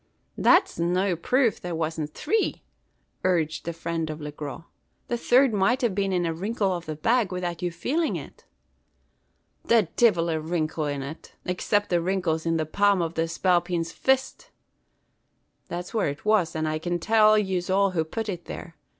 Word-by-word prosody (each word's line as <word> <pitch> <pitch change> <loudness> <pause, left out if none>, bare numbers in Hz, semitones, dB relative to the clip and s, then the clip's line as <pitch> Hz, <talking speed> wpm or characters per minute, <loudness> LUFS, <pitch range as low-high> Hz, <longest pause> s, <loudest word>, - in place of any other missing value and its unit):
"That's - - +3
no 180 +2 +1
proof 245 - +1
there 175 -1 -4
wasn't 160 -2 -3
three," 430 +8 0 0.6
urged 165 -4 0
the 170 - -2
friend 165 -1 -3
of 155 0 -5
Le 150 -1 -6
Gros. 145 +1 -7 0.5
"The 240 - 0
third 255 0 +4
might 235 +7 +2
have 235 -5 +2
been 195 0 0
in 180 -2 +1
a 165 - -1
wrinkle 195 +2 -1
of 170 -2 -7
the 155 - -3
bag, 225 +5 +1
without 175 -2 -3
your 175 -1 -1
feeling 310 - -1
it!" - - -9 1.2
"The 225 -7 +3
divil 175 -8 +4
a 160 - 0
wrinkle 155 -1 -2
it 145 -1 -2
was 135 - -4
in, 155 +4 -6 0.3
except 205 +3 0
the 175 -1 +3
wrinkles 170 -3 -1
in 165 0 +2
the 155 - 0
palm 200 +4 +2
of 165 -1 -1
that 165 0 0
spalpeen's 175 -1 +1
fist! 265 +7 0 1.2
That's 175 +1 -6
where 220 - +1
it 145 +6 -7
was; 205 -7 +2
and 155 0 -1
I 155 0 -1
can 175 +2 -1
tell 215 +3 +4
yez 190 -3 -1
all 195 +1 +3
who 165 -3 0
putt 220 +8 -4
it 180 -4 -5
there. 165 - -8
175 Hz, 185 wpm, -26 LUFS, 165-205 Hz, 1.2 s, third